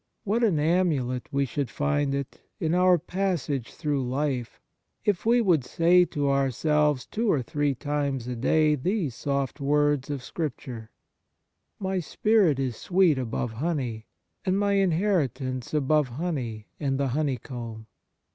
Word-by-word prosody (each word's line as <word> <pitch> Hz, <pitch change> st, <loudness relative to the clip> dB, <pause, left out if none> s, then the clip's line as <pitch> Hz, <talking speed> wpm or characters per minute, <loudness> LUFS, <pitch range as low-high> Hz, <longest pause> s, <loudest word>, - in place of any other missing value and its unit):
What 225 Hz, +3 st, 0 dB
an 200 Hz, -9 st, +3 dB
amulet 150 Hz, -6 st, +1 dB
we 140 Hz, 0 st, +1 dB
should 135 Hz, 0 st, -3 dB
find 145 Hz, 0 st, 0 dB
it 140 Hz, -1 st, -5 dB, 0.2 s
in 160 Hz, 0 st, 0 dB
our 180 Hz, 0 st, +5 dB
passage 165 Hz, -8 st, -2 dB
through 150 Hz, -4 st, -1 dB
life 130 Hz, -2 st, -2 dB, 0.5 s
if 205 Hz, 0 st, 0 dB
we 240 Hz, +1 st, +5 dB
would 175 Hz, -, +3 dB
say 175 Hz, +6 st, +4 dB
to 145 Hz, -4 st, -2 dB
ourselves 140 Hz, +1 st, +2 dB
two 225 Hz, -1 st, 0 dB
or 135 Hz, -5 st, +1 dB
three 145 Hz, +2 st, 0 dB
times 140 Hz, -2 st, -2 dB
a 125 Hz, -, -3 dB
day 150 Hz, +5 st, +3 dB
these 160 Hz, -, -1 dB
soft 140 Hz, +2 st, -2 dB
words 145 Hz, 0 st, +2 dB
of 140 Hz, -3 st, -4 dB
Scripture: 125 Hz, -7 st, -5 dB, 0.5 s
' -, -, -52 dB
My 190 Hz, -1 st, 0 dB
spirit 195 Hz, -3 st, +2 dB
is 130 Hz, -4 st, -2 dB
sweet 180 Hz, -6 st, +3 dB
above 120 Hz, -1 st, -2 dB
honey, 125 Hz, -4 st, -3 dB, 0.4 s
and 190 Hz, 0 st, +1 dB
my 200 Hz, 0 st, +1 dB
inheritance 160 Hz, -, 0 dB
above 150 Hz, -1 st, +2 dB
honey 125 Hz, -6 st, -4 dB
and 135 Hz, -2 st, -1 dB
the 140 Hz, -1 st, +1 dB
honeycomb.'" 120 Hz, -5 st, -3 dB
145 Hz, 145 wpm, -26 LUFS, 130-170 Hz, 0.5 s, our